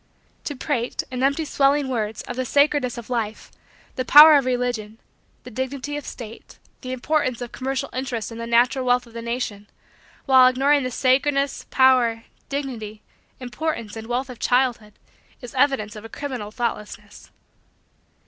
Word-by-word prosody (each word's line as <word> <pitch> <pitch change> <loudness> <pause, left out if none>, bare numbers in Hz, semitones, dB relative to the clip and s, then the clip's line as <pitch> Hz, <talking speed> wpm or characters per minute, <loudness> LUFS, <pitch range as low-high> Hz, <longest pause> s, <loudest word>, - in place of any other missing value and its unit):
To 290 - -4
prate, 255 -3 -2
in 255 0 -4
empty 280 +4 +1
swelling 280 0 +2
words, 220 -4 -3
of - - -7
the 255 - -1
sacredness 285 -1 +1
of 235 +1 -9
life, 225 -3 -3 0.5
the 255 - 0
power 300 +4 +9
of 280 -3 +3
religion, 245 -4 -2 0.5
the 250 - -10
dignity 260 +4 -4
of 295 - -6
state, 230 -1 -10 0.2
the 255 - -6
importance 255 -1 -1
of 245 -1 -6
commercial 270 +1 -3
interests 250 -4 -4
and 230 0 -7
the 230 - -5
natural 245 +3 +3
wealth 250 0 +2
of 230 - -18
the 230 - -6
nation, 230 -4 -4 0.6
while 260 -2 +7
ignoring 275 +3 +3
the 255 - -2
sacredness, 275 +3 +1
power, 250 -4 +3 0.3
dignity, 240 -7 -5 0.4
importance, 245 -4 -4
and 225 0 -8
wealth 250 +2 -2
of 245 - -12
childhood, 245 -4 0 0.5
is 245 -3 -10
evidence 260 -6 +1
of 210 - -9
a 225 - -9
criminal 255 -6 -6
thoughtlessness. 210 -3 -6
255 Hz, 160 wpm, -23 LUFS, 230-270 Hz, 0.6 s, power